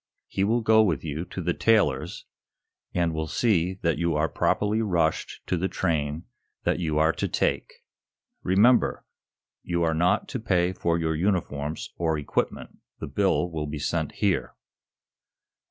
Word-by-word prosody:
He 95 - -1
will 115 +4 +2
go 110 0 +5
with 85 -10 +1
you 80 +2 -4
to 90 - -6
the 85 +1 +1
tailor's, 95 -14 +1 0.7
and 85 -2 0
will 80 0 -2
see 95 -1 +1
that 85 -3 +1
you 85 -2 +1
are 75 +2 +2
properly 105 +8 +1
rushed 85 -7 -1
to 90 - -1
the 90 +3 0
train 80 -4 -1 0.4
that - - +1
you 80 -3 -1
are 80 +1 +4
to - - -2
take. - - -1 0.7
Remember, 105 +7 +3 0.6
you 85 -1 -1
are 80 -1 +2
not 90 +6 +2
to 125 - -3
pay 90 -4 +1
for 85 -2 0
your 80 -1 -1
uniforms 80 -4 -2
or 80 -2 0
equipment. 75 - -3 0.2
The - - -4
bill 90 +3 +1
will 75 -2 -3
be 75 +1 -4
sent 80 +2 -2
here." 100 -4 0
85 Hz, 155 wpm, -26 LUFS, 80-95 Hz, 0.7 s, go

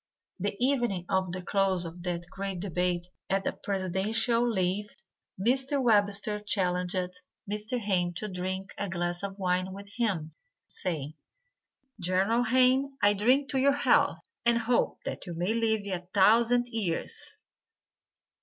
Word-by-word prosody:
The 200 +2 -1
evening 240 -8 +1
of 190 -1 +1
the 185 0 -5
close 190 -2 +1
of 170 +1 -8
that 175 -1 -3
great 195 -2 -3
debate 180 -1 -1 0.2
at 195 0 0
a - - +1
presidential 205 +5 0
levee, 195 0 0 0.5
Mr. 265 +6 +1
Webster 210 -3 +2
challenged 180 -2 -1 0.3
Mr. 210 +4 -1
Hayne 190 -6 +1
to 215 - -1
drink 190 0 -4
a 200 - -2
glass 175 0 -2
of 200 -1 -5
wine 185 -1 0
with 200 +1 -10
him, 180 -10 -1 0.3
saying, 155 -6 -3 0.9
"General 195 +7 +2
Hayne, 260 +3 +3
I 205 0 +6
drink 255 +8 +2
to 270 - +1
your 280 +1 +3
health, - - +3 0.3
and 235 0 +4
hope 235 +1 +1
that - - -5
you 175 - -5
may 180 +6 0
live 220 -2 +1
a 180 -3 -4
thousand 235 +5 +4
years." 205 -8 -3
195 Hz, 140 wpm, -29 LUFS, 180-230 Hz, 0.9 s, I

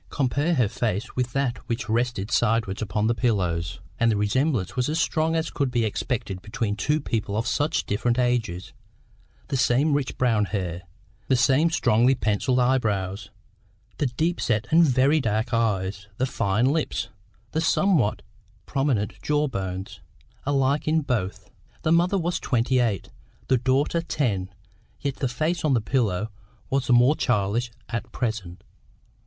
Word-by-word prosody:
Compare 145 +5 0
her 125 -6 +3
face 110 +1 -2
with 125 -1 -1
that 135 -2 -1
which 115 -2 -2
rested 115 -2 -1
sideways 115 -3 +1
upon 105 0 -1
the 115 - +3
pillows, 90 -8 -1 0.2
and 115 0 +4
the 105 - +1
resemblance 110 - 0
was 125 +1 0
as 160 +2 0
strong 160 0 +1
as 160 0 -1
could 135 -3 -2
exist 110 -3 0 0.3
between 105 -1 -2
two 150 +9 +1
people 110 -6 -2
of 115 - -1
such 145 +4 0
different 120 +4 0
ages: 120 -8 -1 0.8
the 140 - -1
same 135 +4 +3
rich 140 -2 -1
brown 115 -5 +2
hair, 90 -4 -3 0.5
the 130 - +3
same 135 +6 +4
strongly 125 -4 +3
pencilled 110 +3 0
eye 130 +1 +3
brows; 100 -2 -2 0.7
the 145 - +2
deep 160 +8 -1
set 110 -2 +1
and 165 +2 +6
very 135 +3 +3
dark 110 +1 -1
eyes, 100 -3 0
the 130 - +1
fine 105 -2 0
lips, 150 +3 0 0.4
the 160 - 0
somewhat 165 - +2 0.4
prominent 135 -7 -1
jaw 150 0 +1
bones, 95 -5 -5 0.5
alike 140 +1 +1
in 160 +1 +3
both. 115 -9 -3 0.3
The 160 - +1
mother 175 +4 +3
was 175 -1 -1
twenty 125 +1 +1
eight, 110 -7 0 0.4
the 130 - +4
daughter 135 +6 +1
ten, 105 - -1 0.5
yet 140 -2 -3
the 135 - 0
face 155 +7 -1
on 145 -4 +3
the - - +3
pillow 110 -3 0 0.4
was 135 -2 0
the 125 - +4
more 125 +5 +5
childish 115 -1 0 0.2
at 120 0 -4
present. 110 -8 -4
120 Hz, 155 wpm, -25 LUFS, 105-140 Hz, 0.8 s, and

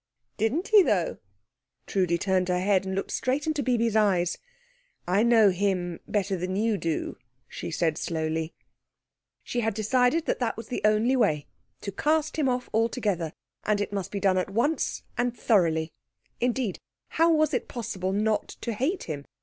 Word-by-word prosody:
"Didn't 255 - 0
he, 430 -2 +8
though?" 195 - +1 0.7
Trudi 180 -3 +1
turned 185 0 +1
her 180 -1 +1
head, 190 0 +2
and 190 - -2
looked 195 - -3
straight 265 +3 0
into 310 -2 0
Bibi's 235 -4 +1
eyes. 190 -5 +2 0.7
"I 185 +4 +3
know 225 -3 +5
him 180 -2 -1
better 200 -2 0
than 185 +1 -3
you 215 0 +1
do," 165 -2 -2 0.3
she - - -6
said 160 -1 0
slowly. 160 0 -2 0.9
She 245 - -2
had 225 -3 0
decided 250 +8 +2
that - - -1
that 235 -4 -1
was 225 - -8
the 250 - -3
only 215 +5 +3
way 155 - +2 0.4
to 200 - -4
cast 310 +9 0
him 275 -3 +2
off 250 0 -1
altogether; 215 -7 0 0.3
and 210 -1 +1
it 205 - -3
must 195 -2 -3
be 200 - -3
done 190 -1 +3
at 185 - -2
once 240 +10 0 0.2
and 245 -1 0
thoroughly. 165 -7 +2 0.5
Indeed, 245 -4 -1 0.3
how 330 +1 +3
was 310 -1 +3
it 250 - -1
possible 200 -6 -3
not 215 +2 +1
to 235 - -2
hate 285 - -1
him? 145 -3 -5
210 Hz, 170 wpm, -27 LUFS, 185-245 Hz, 0.9 s, he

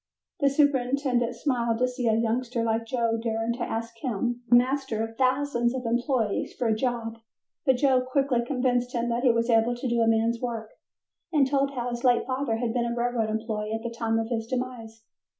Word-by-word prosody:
The 280 -2 +4
superintendent 265 -3 +1
smiled 235 -3 0
to 255 +2 +2
see 250 -1 -3
a 220 - +3
youngster 235 +1 0
like 230 0 0
Joe 230 -2 0
daring 225 0 -1
to 240 - -8
ask 230 0 -3
him, 240 0 -2
the 240 - +7
master 255 -2 +1
of 225 0 -6
thousands 255 -1 +1
of 250 -1 -4
employees, 235 -2 0
for 250 - -1
a 220 - +3
job, 230 -1 -2 0.5
but 265 - +5
Joe 260 -1 +3
quickly 255 -1 +1
convinced 245 -1 0
him 240 0 0
that 235 +1 0
he 250 -2 +5
was 230 0 0
able 230 +1 +3
to 245 +2 -4
do 235 -1 +1
a 225 - +3
man's 225 +1 +2
work 230 -3 -4 0.6
and 295 -4 +4
told 275 +1 +1
how 245 0 -2
his 240 0 -5
late 245 -2 +3
father 260 -2 -1
had 230 -1 -2
been 235 -1 0
a - - -2
railroad 240 -2 0
employee 215 -1 -3
at 225 0 -3
the 235 - -3
time 225 -1 0
of 225 0 -2
his 225 -2 -2
demise. 240 -3 -5
240 Hz, 205 wpm, -26 LUFS, 225-255 Hz, 0.6 s, the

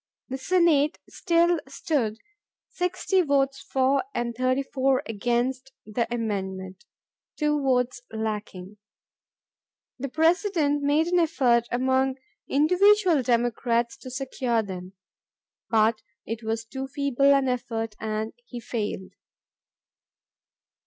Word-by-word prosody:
The 265 +1 -4
Senate 320 -3 +3
still 340 -1 +2
stood 260 -6 -1 0.6
6Q 365 0 +1
votes 275 -1 +1
for 265 +1 +1
and 240 0 -1
34 260 +1 +1
against 245 +4 -1
the 230 +2 -2
amendment—2 205 - -4
votes 250 -2 +1
lacking. 210 -3 -5 1.2
The 275 +2 -3
President 320 - +2
made 290 +3 +2
an 355 +1 +2
effort 250 -8 +2
among 260 +1 +1 0.3
individual 360 +2 +4
Democrats 240 0 +1
to 265 - -10
secure 255 -3 -1
them. 185 -1 -8 0.8
But 220 0 +3 0.2
it 225 +1 -4
was 225 0 -3
too 265 +3 -5
feeble 280 -1 +2
an 275 -1 +2
effort 225 -3 -2
and 220 0 -3
he 240 0 -8
failed. 210 -5 -4
255 Hz, 100 wpm, -26 LUFS, 225-285 Hz, 1.2 s, individual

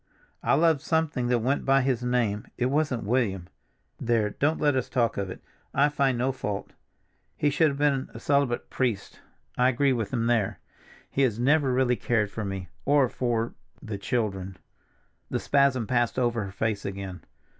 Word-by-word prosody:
I - - +3
loved 160 -3 +3
something 160 -5 0
that 120 -2 +1
went 135 +4 +1
by 135 -1 +3
his 130 -2 0
name, 120 -4 0
it 125 +1 0
wasn't 145 -5 0
William. 100 -6 0 0.5
There, 115 -3 +1
don't 155 +7 0
let 145 -2 +2
us 130 - -1
talk 115 -3 +1
of 100 -1 -3
it; - - -9 0.3
I 145 +2 +4
find 140 -4 +1
no 130 +3 +1
fault. 105 -6 -5 0.6
He 145 - +2
should 160 +3 +4
have 140 -2 -2
been 140 -2 +1
a - - -9
celibate 140 -4 0
priest; 120 -7 -2 0.4
I 125 +1 +5
agree 135 +2 +2
with 110 -5 -2
him 115 -3 0
there. 115 -5 +1 0.5
He 140 - 0
has 120 -6 +2
never 140 +2 +3
really 125 -1 +2
cared 105 0 0
for 110 - -4
me, 95 -2 -4 0.2
or 140 -2 +3
for—the 115 -2 -4
children." 95 -4 -2 0.7
The - - -1
spasm 140 -4 +2
passed 120 0 0
over 120 -4 +1
her 95 - -7
face 105 0 -2
again. 95 -2 -6
125 Hz, 175 wpm, -27 LUFS, 110-135 Hz, 0.7 s, I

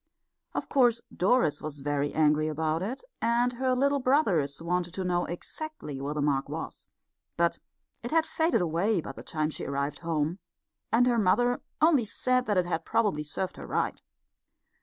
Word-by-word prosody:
Of - - -2
course 240 -4 +3
Doris 185 - +2
was 150 -2 -6
very 145 0 0
angry 155 0 +3
about 155 +1 -1
it, 235 - -4 0.2
and 240 +2 +2
her 255 +1 +1
little 280 +2 +2
brothers 200 - +2
wanted 175 +1 -2
to 190 - -2
know 175 -1 +1
exactly 175 - -6
where 145 +2 -3
the 150 - 0
mark 140 -2 +1
was. - - -6 0.5
But 170 0 +2 0.4
it 240 - -5
had 320 +2 +3
faded 320 - +1
away 175 +5 +1
by - - -6
the - - -10
time 155 0 -2
she - - -6
arrived 140 +1 -2
home, 165 +1 -1 0.5
and 235 +3 +5
her 240 -2 +3
mother 245 +5 +2 0.2
only 305 -7 +5
said 255 +4 0
that 205 -3 +1
it 180 - +3
had 170 -2 -2
probably 205 -10 +1
served 170 +5 -4
her - - -8
right. - - -1
180 Hz, 175 wpm, -28 LUFS, 155-245 Hz, 0.5 s, and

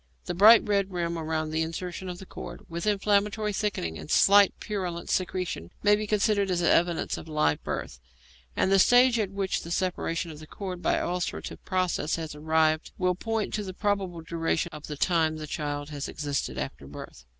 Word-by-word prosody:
The 175 - -2
bright 215 +6 +7
red 200 -2 +1
rim 170 -1 -2
round 160 -1 -2
the 160 - +1
insertion 175 +3 -4
of 180 - -5
the 190 - -10
cord, - - -9
with 170 +3 -4
inflammatory 210 +1 +1
thickening 190 - -2
and 75 - -9
slight 200 0 +6
purulent 180 -5 -4
secretion, 180 - -2
may 205 0 +6
be 210 0 -3
considered 205 -1 +2
as 175 -1 0
evidence 170 0 +2
of - - -11
live 150 - +1
birth, 60 - -4 0.6
and 190 - +1
the 195 - +5
stage 245 +3 +6
at 205 -3 0
which 195 -1 -2
the 170 - -9
separation 170 -2 -1
of 150 - -10
the 155 - -11
cord 185 -1 -6
by - - +2
ulcerative 180 +1 -3
process 185 -4 0
has 160 -2 -5
arrived 155 +1 +1
will 180 -1 +2
point 225 +3 -2
to 210 - -1
the 185 -2 -7
probable 195 -5 -1
duration 165 +1 -1
of 150 -1 -8
time 160 -1 +2
the 155 - -6
child 145 0 -4
has 145 -1 -4
existed 145 -2 -3
after - - -5
birth. - - -10
175 Hz, 185 wpm, -27 LUFS, 160-200 Hz, 0.6 s, bright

